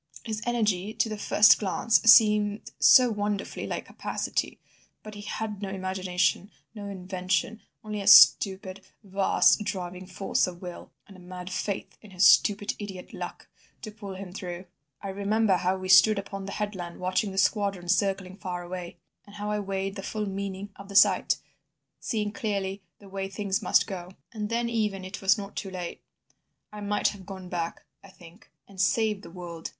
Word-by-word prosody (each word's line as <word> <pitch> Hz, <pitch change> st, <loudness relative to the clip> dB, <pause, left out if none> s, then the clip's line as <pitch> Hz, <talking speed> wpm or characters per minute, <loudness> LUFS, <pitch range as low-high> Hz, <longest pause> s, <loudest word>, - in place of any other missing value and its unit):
His 215 Hz, -2 st, -4 dB
energy 215 Hz, -4 st, 0 dB
to 225 Hz, -, +1 dB
the 215 Hz, -, -3 dB
first 210 Hz, 0 st, +5 dB
glance 220 Hz, +3 st, +2 dB
seemed 210 Hz, -2 st, +5 dB
so 250 Hz, -2 st, +7 dB
wonderfully 205 Hz, -1 st, -3 dB
like -, -, -4 dB
capacity! -, -, -3 dB, 0.4 s
But 215 Hz, -, -9 dB
he 205 Hz, -, -9 dB
had 210 Hz, 0 st, -5 dB
no 200 Hz, -, -4 dB
imagination, 185 Hz, 0 st, -1 dB, 0.2 s
no 205 Hz, -2 st, -7 dB
invention, 190 Hz, +4 st, -2 dB, 0.2 s
only 210 Hz, -1 st, -4 dB
a 200 Hz, -, -6 dB
stupid, 195 Hz, -1 st, +6 dB, 0.2 s
vast, 195 Hz, +1 st, +3 dB
driving 185 Hz, -3 st, -5 dB
force 190 Hz, +1 st, 0 dB
of 175 Hz, -1 st, -8 dB
will, 180 Hz, -1 st, -9 dB, 0.2 s
and 195 Hz, -, -14 dB
a -, -, -14 dB
mad 180 Hz, 0 st, -9 dB
faith 195 Hz, +1 st, -4 dB
in 215 Hz, -, -14 dB
his 185 Hz, 0 st, +2 dB
stupid 205 Hz, 0 st, +4 dB
idiot 195 Hz, -3 st, -8 dB
'luck' -, -, -7 dB, 0.4 s
to 215 Hz, -, -6 dB
pull 205 Hz, -2 st, -9 dB
him 185 Hz, -1 st, -8 dB
through. 180 Hz, -2 st, -6 dB, 0.4 s
I 200 Hz, -, -4 dB
remember 200 Hz, 0 st, +1 dB
how 185 Hz, +1 st, 0 dB
we 185 Hz, 0 st, -6 dB
stood 200 Hz, +3 st, +7 dB
upon 195 Hz, 0 st, -6 dB
the 200 Hz, -, -5 dB
headland 190 Hz, -5 st, -5 dB
watching 185 Hz, +3 st, -1 dB
the 190 Hz, -, -8 dB
squadron 200 Hz, -3 st, +1 dB
circling 195 Hz, 0 st, 0 dB
far 180 Hz, -3 st, -5 dB
away, 175 Hz, 0 st, -7 dB, 0.3 s
and 205 Hz, -, -14 dB
how 210 Hz, 0 st, -4 dB
I 210 Hz, -, -1 dB
weighed 195 Hz, 0 st, -3 dB
the -, -, -5 dB
full 215 Hz, +2 st, -3 dB
meaning 195 Hz, 0 st, -5 dB
of 200 Hz, 0 st, -12 dB
the 200 Hz, -, -9 dB
sight, 195 Hz, -6 st, +5 dB, 0.6 s
seeing 210 Hz, -3 st, -2 dB
clearly 200 Hz, -3 st, -3 dB, 0.2 s
the 200 Hz, -, -16 dB
way 195 Hz, 0 st, -5 dB
things 195 Hz, -1 st, -2 dB
must -, -, +3 dB
go. 180 Hz, -4 st, -7 dB, 0.2 s
And 210 Hz, -2 st, -4 dB
then 235 Hz, +1 st, 0 dB
even 210 Hz, -5 st, -1 dB
it 185 Hz, +2 st, -7 dB
was 195 Hz, 0 st, +4 dB
not 200 Hz, -1 st, -8 dB
too 195 Hz, -, -4 dB
late. 180 Hz, -2 st, -6 dB, 0.7 s
I 210 Hz, -, -8 dB
might 205 Hz, 0 st, +1 dB
have 200 Hz, -2 st, -10 dB
gone 190 Hz, -2 st, -8 dB
back, 170 Hz, -2 st, -4 dB, 0.2 s
I 195 Hz, -, -14 dB
think, 180 Hz, +2 st, -17 dB, 0.2 s
and 195 Hz, -2 st, -5 dB
saved 210 Hz, 0 st, +1 dB
the -, -, -11 dB
world. 170 Hz, -2 st, -8 dB
195 Hz, 180 wpm, -27 LUFS, 185-210 Hz, 0.7 s, so